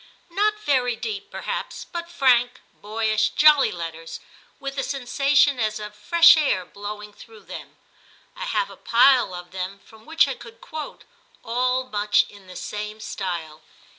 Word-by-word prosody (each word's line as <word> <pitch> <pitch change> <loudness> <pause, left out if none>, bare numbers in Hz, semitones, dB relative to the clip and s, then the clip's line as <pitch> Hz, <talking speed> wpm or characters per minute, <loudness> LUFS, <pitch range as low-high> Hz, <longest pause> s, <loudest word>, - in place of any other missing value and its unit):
Not 420 +4 +1
very 255 - +1
deep 410 - -5
perhaps, - - -5
but 340 -1 -6
frank, 250 -6 +3
boyish, 215 0 0
jolly 300 -2 +6
letters, 165 -1 -7 0.4
with 275 0 -5
a - - 0
sensation 275 +1 +2
as 215 -1 -1
of 210 0 -7
fresh 335 +13 +6
air 275 - +1
blowing 210 +2 -8
through 220 0 -15
them. - - -10 0.6
I - - -5
have - - -1
a - - -13
pile 245 -5 +4
of 175 0 -9
them 185 +1 -5
from 220 +4 -18
which 325 -2 +4
I 275 - -2
could 230 -2 -13
quote, 310 +4 -8 0.4
all 250 +2 0
much 210 -4 +2
in 200 -2 -16
the 180 - -11
same 210 +2 -6
style. 170 -7 -5
230 Hz, 155 wpm, -23 LUFS, 205-280 Hz, 0.6 s, jolly